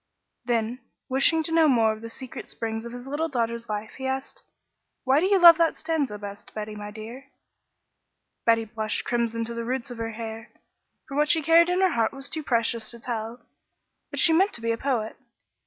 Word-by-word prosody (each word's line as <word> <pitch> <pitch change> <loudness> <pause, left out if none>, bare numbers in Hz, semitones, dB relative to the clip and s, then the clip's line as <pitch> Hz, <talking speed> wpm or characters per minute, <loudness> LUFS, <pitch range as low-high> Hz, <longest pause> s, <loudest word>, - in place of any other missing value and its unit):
Then, 235 0 -1 0.3
wishing 275 +5 +3
to 325 - -4
know 325 -1 +5
more 225 -5 +4
of 220 - -11
the 230 - -7
secret 255 +2 -8
springs 225 0 -4
of 235 - -7
his 245 +1 -8
little 295 +4 -2
daughter's 235 -3 -2
life, 210 0 -4
he 265 - -3
asked: 265 - -4 0.6
"Why 265 +2 +4
do 365 - +2
you 395 0 +4
love 340 -2 +9
that 330 -1 +2
stanza 300 -9 -1
best, 205 0 -10
Betty, 215 0 -5
my 205 0 -7
dear?" 225 +6 -9 1.2
Betty 230 -1 +3
blushed 220 0 -3
crimson 230 -1 -1
to 235 - -5
the 235 0 -4
roots 255 +2 -3
of 240 - -8
her 225 0 -3
hair, 225 0 -7 0.6
for 275 - -7
what 300 +1 +2
she 320 -2 +4
carried 335 +2 +5
in 360 +1 +1
her 375 -1 +4
heart 230 -5 +1
was 270 0 -6
too 315 - -1
precious 230 -4 0
to 235 - -8
tell, 230 0 -5 0.7
but - - -4
she 330 - +7
meant 385 +5 +3
to 235 - -4
be 230 0 0
a - - +1
poet. 230 -5 -2
235 Hz, 205 wpm, -25 LUFS, 225-290 Hz, 1.2 s, love